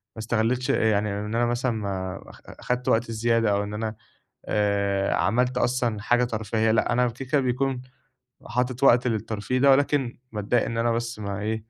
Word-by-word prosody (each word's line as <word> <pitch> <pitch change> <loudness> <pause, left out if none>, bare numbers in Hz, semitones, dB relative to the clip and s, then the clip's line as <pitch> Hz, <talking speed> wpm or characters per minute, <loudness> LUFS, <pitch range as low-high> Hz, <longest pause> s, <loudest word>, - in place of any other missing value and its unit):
ما - - -9
استغليتش 120 +2 0
يعني 105 -1 +2
إن 105 +2 -4
أنا 120 +1 +2
مثلًا 120 +1 0
ما 95 -4 -4
أخ - - -15 0.3
خدت 125 0 -1
وقت 115 +1 +1
زيادة، 115 -1 +1
أو 100 0 +1
إن 105 0 -6
أنا 110 0 -3 0.5
آآ، 100 -1 0
عملت 125 +7 +1
أصلًا 120 -4 0
حاجة 120 +3 +2
ترفيهية 110 -1 -1
لأ، 110 +1 +2
أنا 125 +1 +3
الفكرة 130 +4 -1
بيكون 130 0 -1 0.6
حاطط 125 +1 -2
وقت 125 -2 +5
للترفيه 110 +2 -2
ده، 140 +2 +5
ولكن 135 -2 +2
باتضايق 105 +3 0
إن 115 0 -3
أنا 115 +1 +2
بس 115 0 -3
ما 100 -1 -4
إيه، 110 +2 -1
115 Hz, 175 wpm, -25 LUFS, 105-125 Hz, 0.6 s, وقت